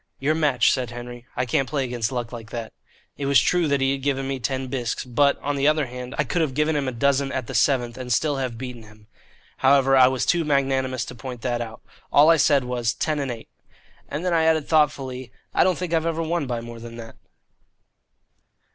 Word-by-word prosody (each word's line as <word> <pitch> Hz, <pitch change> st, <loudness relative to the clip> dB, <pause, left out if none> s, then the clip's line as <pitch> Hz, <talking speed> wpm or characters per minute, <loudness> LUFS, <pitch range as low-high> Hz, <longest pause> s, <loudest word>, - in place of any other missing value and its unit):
"Your 145 Hz, +3 st, +1 dB
match," 145 Hz, -7 st, +3 dB
said 125 Hz, -3 st, -1 dB
Henry; 120 Hz, 0 st, -9 dB
"I 125 Hz, -, 0 dB
can't 135 Hz, +1 st, 0 dB
play 140 Hz, -3 st, -1 dB
against 120 Hz, -2 st, -2 dB
luck 120 Hz, -3 st, -3 dB
like 115 Hz, -2 st, -8 dB
that." 115 Hz, -2 st, -6 dB, 0.4 s
It 140 Hz, -, -3 dB
was 140 Hz, -1 st, +6 dB
true 175 Hz, -2 st, +2 dB
that 140 Hz, -1 st, +1 dB
he 135 Hz, 0 st, +2 dB
had 135 Hz, 0 st, -2 dB
given 135 Hz, -1 st, -1 dB
me 135 Hz, -1 st, -3 dB
ten 130 Hz, +1 st, -2 dB
bisques, 125 Hz, -2 st, -3 dB
but, 140 Hz, +3 st, +2 dB
on 145 Hz, 0 st, -1 dB
the 140 Hz, +1 st, +2 dB
other 155 Hz, -1 st, +3 dB
hand, 125 Hz, 0 st, -7 dB
I 150 Hz, -, +2 dB
could 175 Hz, +2 st, -1 dB
have 145 Hz, -5 st, -1 dB
given 150 Hz, +1 st, +1 dB
him 140 Hz, -2 st, -1 dB
a -, -, -1 dB
dozen 140 Hz, +3 st, +1 dB
at 130 Hz, -, -3 dB
the -, -, -7 dB
seventh 125 Hz, -3 st, +1 dB
and 125 Hz, -1 st, -5 dB
still 145 Hz, +4 st, +1 dB
have 130 Hz, -4 st, -3 dB
beaten 125 Hz, -1 st, -7 dB
him. 105 Hz, -1 st, -17 dB, 0.5 s
However, 135 Hz, 0 st, +4 dB
I 130 Hz, -1 st, +7 dB
was 130 Hz, -1 st, 0 dB
too 170 Hz, -1 st, +2 dB
magnanimous 135 Hz, -3 st, 0 dB
to -, -, -8 dB
point 125 Hz, -1 st, -8 dB
that 120 Hz, -1 st, -1 dB
out. 115 Hz, 0 st, -7 dB, 0.3 s
All 150 Hz, +3 st, +7 dB
I 165 Hz, -, +5 dB
said 140 Hz, -2 st, +3 dB
was, 120 Hz, -2 st, -1 dB
"Ten 155 Hz, +2 st, -1 dB
and 140 Hz, -2 st, -2 dB
eight." 115 Hz, -2 st, -7 dB, 0.6 s
And 150 Hz, +5 st, -4 dB
then 180 Hz, -, +1 dB
I 165 Hz, -1 st, +3 dB
added 160 Hz, -2 st, +2 dB
thoughtfully, 135 Hz, -5 st, 0 dB, 0.2 s
"I -, -, +4 dB
don't 185 Hz, -1 st, +2 dB
think 180 Hz, -2 st, -4 dB
I've 165 Hz, 0 st, +1 dB
ever 165 Hz, 0 st, -1 dB
won 165 Hz, -3 st, -1 dB
by 120 Hz, -2 st, -3 dB
more 115 Hz, 0 st, -9 dB
than 115 Hz, 0 st, -9 dB
that." 115 Hz, -1 st, -10 dB
135 Hz, 230 wpm, -23 LUFS, 120-145 Hz, 0.6 s, I